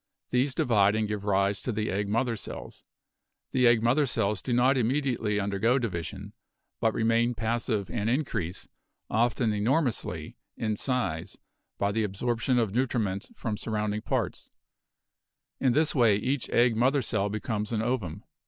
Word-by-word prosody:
These 130 Hz, +2 st, +1 dB
divide 105 Hz, -3 st, +3 dB
and 110 Hz, -1 st, 0 dB
give 105 Hz, -1 st, -4 dB
rise 100 Hz, 0 st, +1 dB
to 125 Hz, -, -2 dB
the 110 Hz, -1 st, -2 dB
egg 100 Hz, +1 st, -1 dB
mother 115 Hz, +2 st, +1 dB
cells. -, -, -8 dB, 0.7 s
The 125 Hz, -1 st, +4 dB
egg 115 Hz, -1 st, +4 dB
mother 135 Hz, +5 st, +3 dB
cells 105 Hz, -4 st, 0 dB
do 130 Hz, -, -4 dB
not 125 Hz, +3 st, +4 dB
immediately 120 Hz, -4 st, 0 dB
undergo 100 Hz, +5 st, +1 dB
division, 100 Hz, -2 st, -4 dB, 0.5 s
but 115 Hz, -1 st, +1 dB
remain 115 Hz, +2 st, +2 dB
passive 110 Hz, -2 st, -1 dB
and 110 Hz, -1 st, -1 dB
increase, 115 Hz, -, -2 dB, 0.4 s
often 115 Hz, 0 st, +2 dB
enor 115 Hz, +10 st, +2 dB
mously, 125 Hz, -5 st, -4 dB, 0.2 s
in 110 Hz, -1 st, -1 dB
size, 105 Hz, -, -2 dB, 0.4 s
by 100 Hz, 0 st, +1 dB
the 110 Hz, +2 st, 0 dB
absorption 120 Hz, +5 st, 0 dB
of 110 Hz, -5 st, +1 dB
nutriment 115 Hz, -6 st, -1 dB
from 110 Hz, -, -3 dB
sur 110 Hz, -, -5 dB
rounding 105 Hz, 0 st, -1 dB
parts; -, -, -2 dB, 1.1 s
in 130 Hz, -3 st, +3 dB
this 155 Hz, +2 st, +2 dB
way 115 Hz, -7 st, +4 dB
each 130 Hz, +5 st, -2 dB
egg 120 Hz, -1 st, +3 dB
mother 130 Hz, +4 st, +2 dB
cell 100 Hz, -2 st, 0 dB
becomes 105 Hz, +1 st, -3 dB
an 110 Hz, -1 st, 0 dB
ovum. 105 Hz, -8 st, -2 dB
115 Hz, 155 wpm, -28 LUFS, 105-125 Hz, 1.1 s, The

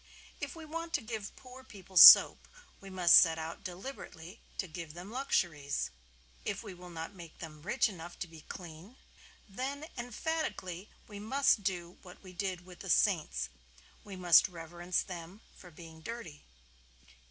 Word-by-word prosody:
If -, -, -5 dB
we 325 Hz, -1 st, -10 dB
want 330 Hz, +2 st, -6 dB
to 295 Hz, -, +1 dB
give 220 Hz, -3 st, -6 dB
poor 255 Hz, 0 st, -13 dB
people 195 Hz, -6 st, -15 dB
soap -, -, +10 dB, 0.3 s
we 195 Hz, -, -11 dB
must 180 Hz, -2 st, +6 dB
set 165 Hz, -2 st, +5 dB
out 160 Hz, +1 st, -7 dB
deliberately 185 Hz, -2 st, -9 dB, 0.2 s
to -, -, -2 dB
give 165 Hz, -1 st, -8 dB
them 180 Hz, +4 st, -9 dB
luxuries. 175 Hz, -, -1 dB, 0.5 s
If -, -, -4 dB
we 205 Hz, -4 st, -8 dB
will 180 Hz, 0 st, -12 dB
not 165 Hz, +2 st, -7 dB
make 170 Hz, -4 st, -12 dB
them 155 Hz, -2 st, -10 dB
rich 210 Hz, -, +1 dB
enough 175 Hz, -4 st, -9 dB
to 175 Hz, -, -3 dB
be 160 Hz, -1 st, -14 dB
clean, 175 Hz, +7 st, -11 dB, 0.5 s
then 270 Hz, +8 st, -5 dB
emphatically 240 Hz, -, -4 dB, 0.2 s
we 205 Hz, -2 st, -9 dB
must 240 Hz, 0 st, +2 dB
do 180 Hz, -2 st, -4 dB
what 180 Hz, +1 st, -14 dB
we 185 Hz, -1 st, -12 dB
did 185 Hz, -2 st, -4 dB
with 180 Hz, -1 st, -14 dB
the -, -, -8 dB
saints. 60 Hz, 0 st, +1 dB, 0.5 s
We 200 Hz, -2 st, -9 dB
must 180 Hz, 0 st, +5 dB
reverence 175 Hz, +1 st, -3 dB
them 180 Hz, +2 st, -9 dB
for 180 Hz, -, -14 dB
being 160 Hz, -1 st, -13 dB
dirty. 170 Hz, -6 st, -8 dB
185 Hz, 160 wpm, -32 LUFS, 170-220 Hz, 0.5 s, soap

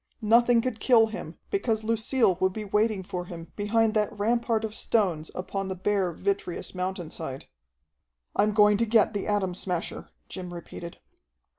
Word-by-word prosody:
Nothing 235 Hz, +2 st, +5 dB
could 230 Hz, -2 st, -3 dB
kill 230 Hz, -1 st, +5 dB
him, -, -, -7 dB
because 230 Hz, -, 0 dB
Lucille 225 Hz, -1 st, +2 dB
would 190 Hz, 0 st, +2 dB
be 215 Hz, 0 st, -5 dB
waiting 210 Hz, 0 st, +1 dB
for 180 Hz, -1 st, -5 dB
him 170 Hz, -2 st, -9 dB
behind 220 Hz, +1 st, +2 dB
that 210 Hz, -2 st, +1 dB
rampart 225 Hz, +1 st, 0 dB
of 215 Hz, -, -6 dB
stones 185 Hz, -9 st, 0 dB
upon 195 Hz, +1 st, -3 dB
the 190 Hz, -, -3 dB
bare, 190 Hz, -1 st, 0 dB
vitreous 195 Hz, 0 st, -3 dB
mountainside. 175 Hz, -7 st, -4 dB, 0.9 s
"I'm 210 Hz, -, +3 dB
going 210 Hz, -1 st, +6 dB
to 230 Hz, +1 st, +1 dB
get 220 Hz, 0 st, +4 dB
the 205 Hz, -, -3 dB
Atom 200 Hz, -3 st, 0 dB
Smasher," 175 Hz, -1 st, -3 dB, 0.2 s
Jim 180 Hz, -2 st, -7 dB
repeated. 170 Hz, 0 st, -8 dB
205 Hz, 155 wpm, -27 LUFS, 185-225 Hz, 0.9 s, going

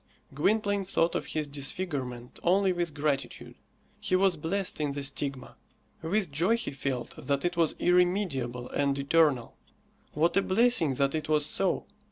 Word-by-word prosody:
Gwynplaine 205 Hz, +6 st, +1 dB
thought 170 Hz, -3 st, +1 dB
of -, -, -2 dB
his 155 Hz, -1 st, -2 dB
disfigurement 135 Hz, -4 st, -4 dB
only 190 Hz, +2 st, +3 dB
with 170 Hz, -4 st, -3 dB
gratitude. 140 Hz, -5 st, -2 dB, 0.5 s
He 185 Hz, -, 0 dB
was 190 Hz, -1 st, +3 dB
blessed 180 Hz, +2 st, -2 dB
in 145 Hz, -2 st, -1 dB
the 140 Hz, 0 st, -4 dB
stigma. 135 Hz, -1 st, -4 dB, 0.4 s
With 180 Hz, +1 st, 0 dB
joy 175 Hz, +11 st, +2 dB
he 235 Hz, -, -4 dB
felt 135 Hz, -3 st, -3 dB
that 140 Hz, +1 st, -1 dB
it 175 Hz, 0 st, 0 dB
was 165 Hz, -2 st, +2 dB
irremediable 175 Hz, -10 st, +1 dB
and 140 Hz, -1 st, 0 dB
eternal. 140 Hz, -3 st, +2 dB, 0.6 s
What 160 Hz, +3 st, +2 dB
a -, -, +5 dB
blessing 190 Hz, -, +2 dB
that 140 Hz, +1 st, +1 dB
it 155 Hz, -1 st, -3 dB
was 150 Hz, -1 st, +3 dB
so! 195 Hz, +5 st, 0 dB
155 Hz, 155 wpm, -29 LUFS, 140-185 Hz, 0.6 s, a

